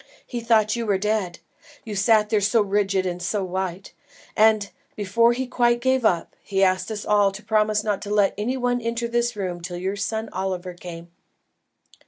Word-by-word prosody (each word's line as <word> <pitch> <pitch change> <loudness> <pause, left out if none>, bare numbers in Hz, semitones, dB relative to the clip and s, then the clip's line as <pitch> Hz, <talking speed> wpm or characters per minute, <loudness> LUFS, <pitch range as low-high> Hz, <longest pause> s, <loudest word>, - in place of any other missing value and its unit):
He 240 - -5
thought 225 -2 +2
you 235 -1 -3
were 200 -2 +2
dead, 200 -3 -1 0.5
you 215 -2 -5
sat 210 +1 +3
there 215 -2 +2
so 215 +2 +3
rigid 195 -1 0
and 180 -1 -3
so 195 +3 -1
white, 185 0 -4 0.4
and, 215 -2 +3 0.2
before 230 +4 +3
he 260 +2 -2
quite 240 -1 +2
gave 260 0 +1
up, 175 -6 +1
he 195 -1 0
asked 185 +2 +2
us 215 -1 -5
all 205 -1 +3
to 200 +2 -10
promise 215 0 +1
not 210 -2 -1
to 205 - -7
let 205 -2 +3
any 240 +6 -2
one 245 -1 0
enter 230 +1 -2
this 240 0 0
room 180 -4 -4
till 175 +1 -6
your 190 +3 -2
son 220 +2 -3
Oliver 185 -1 -3
came." 170 -1 -10
210 Hz, 190 wpm, -23 LUFS, 190-230 Hz, 0.5 s, sat